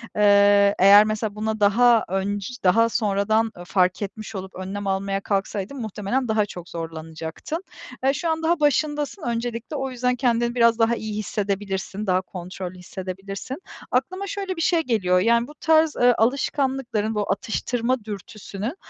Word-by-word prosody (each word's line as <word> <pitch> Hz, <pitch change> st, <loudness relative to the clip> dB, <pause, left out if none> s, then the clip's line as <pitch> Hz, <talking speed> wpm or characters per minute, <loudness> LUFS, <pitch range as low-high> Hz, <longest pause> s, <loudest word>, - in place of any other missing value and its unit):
Eee, 200 Hz, -1 st, +5 dB
eğer 200 Hz, +2 st, +8 dB
mesela 215 Hz, -1 st, -2 dB
buna 220 Hz, 0 st, -2 dB
daha 230 Hz, +3 st, +4 dB
önc 195 Hz, +1 st, -1 dB, 0.2 s
daha 230 Hz, +5 st, +4 dB
sonradan, 220 Hz, 0 st, +1 dB
ııı, 175 Hz, -, -9 dB
fark 185 Hz, 0 st, +1 dB
etmiş 215 Hz, +2 st, -6 dB
olup 190 Hz, 0 st, -7 dB
önlem 195 Hz, +2 st, -5 dB
almaya 195 Hz, 0 st, -1 dB
kalksaydın 200 Hz, +5 st, -2 dB
muhtemelen 220 Hz, +4 st, -2 dB
daha 215 Hz, -1 st, +2 dB
çok 175 Hz, -3 st, -10 dB
zorlanacaktın. 160 Hz, -, -6 dB, 0.4 s
Eee, 270 Hz, -, +3 dB
şu 335 Hz, +3 st, -2 dB
an 320 Hz, 0 st, -1 dB
daha 335 Hz, 0 st, +2 dB
başındasın. 295 Hz, +3 st, 0 dB
Öncelikle 235 Hz, +2 st, -3 dB
o 270 Hz, -2 st, -3 dB
yüzden 250 Hz, 0 st, 0 dB
kendini 240 Hz, -1 st, +1 dB
biraz 235 Hz, -1 st, +4 dB
daha 230 Hz, +1 st, +3 dB
iyi 215 Hz, -2 st, -5 dB
hissedebilirsin, 200 Hz, 0 st, -3 dB
daha 185 Hz, 0 st, +2 dB
kontrollü 185 Hz, 0 st, -7 dB
hissedebilirsin. 195 Hz, +7 st, -6 dB, 0.4 s
Aklıma 370 Hz, +10 st, -1 dB
şöyle 390 Hz, -2 st, -4 dB
bir 330 Hz, -, -4 dB
şey 330 Hz, 0 st, +3 dB
geliyor, 195 Hz, -, +2 dB
yani, 235 Hz, +4 st, +3 dB
bu 295 Hz, -, -12 dB
tarz, 320 Hz, -1 st, +3 dB
eee, 245 Hz, 0 st, +6 dB
alışkanlıkların, 250 Hz, -3 st, 0 dB
bu 205 Hz, -2 st, -1 dB
atıştırma 235 Hz, +4 st, -1 dB
dürtüsünün 210 Hz, -, -6 dB
215 Hz, 150 wpm, -23 LUFS, 195-250 Hz, 0.4 s, eğer